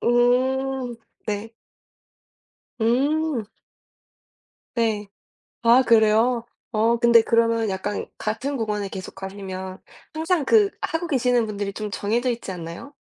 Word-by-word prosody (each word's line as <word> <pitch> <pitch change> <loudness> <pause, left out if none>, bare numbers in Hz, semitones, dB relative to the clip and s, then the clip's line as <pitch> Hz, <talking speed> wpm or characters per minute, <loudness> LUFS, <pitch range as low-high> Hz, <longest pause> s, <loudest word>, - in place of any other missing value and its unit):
음. 255 +1 +2 0.3
네. 215 +1 -3 1.3
음. 275 +3 +1 1.3
네. 220 -3 0 0.6
아 240 +2 +6
그래요? 230 +1 +4 0.3
어 225 +1 +2
근데 235 0 +6
그러면은 230 -1 +2
약간 195 +2 -3
같은 265 +6 -2
공원에 210 -3 -2
계속 190 -1 -7
가시면 190 -1 -7 0.4
항상 320 -1 0
그 415 +4 +5
하고 325 +2 -2
계시는 250 -5 +2
분들이 205 -2 -4
좀 210 +1 -5
정해져 230 +6 0
있지 230 -4 -5
않나요? 170 - -8
230 Hz, 215 characters per minute, -23 LUFS, 210-255 Hz, 1.3 s, 아